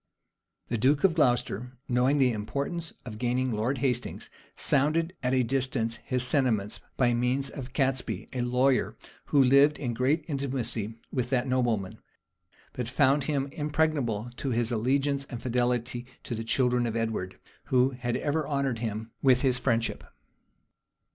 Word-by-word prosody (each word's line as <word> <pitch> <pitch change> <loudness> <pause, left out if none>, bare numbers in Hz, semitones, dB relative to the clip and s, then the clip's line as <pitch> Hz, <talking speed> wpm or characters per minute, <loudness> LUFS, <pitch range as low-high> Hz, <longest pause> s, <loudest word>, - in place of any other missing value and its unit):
The 115 - -1
duke 140 +5 +3
of 190 -4 +5
Glocester, 125 - +1
knowing 125 +3 +2
the 130 -3 +4
importance 140 +10 -3
of 110 -3 -7
gaining 125 +1 0
Lord 115 +5 0
Hastings, 125 -2 -2 0.2
sounded 155 +5 +1
at 130 0 +1
a 130 - +3
distance 125 -2 -1
his 125 -1 -2
sentiments, 125 -6 +1 0.2
by 120 -2 +3
means 125 +3 0
of 130 -3 -7
Catesby, 130 -6 -1
a 125 - -1
lawyer, 125 +2 +2 0.3
who 140 -2 +4
lived 140 +3 +5
in 120 -4 -3
great 140 +7 +1
intimacy 125 -7 -3 0.2
with 125 -2 -1
that 130 0 +1
nobleman; 120 -7 0 0.7
but 125 -2 -4
found 140 +1 +3
him 140 -3 0
impregnable 145 - 0
in 135 - 0
his 120 0 +1
allegiance 140 +4 +1
and 125 -4 -7
fidelity 120 0 -1 0.2
to - - -5
the 115 0 -3
children 125 0 +2
of 115 - -3
Edward, 110 -5 -2 0.3
who 130 +1 +3
had 120 -2 -2
ever 150 0 -1
honored 140 -5 -1
him 110 0 -4
with 130 -2 +4
his 125 -2 +2
friendship. 115 -1 0
125 Hz, 150 wpm, -28 LUFS, 120-140 Hz, 0.7 s, of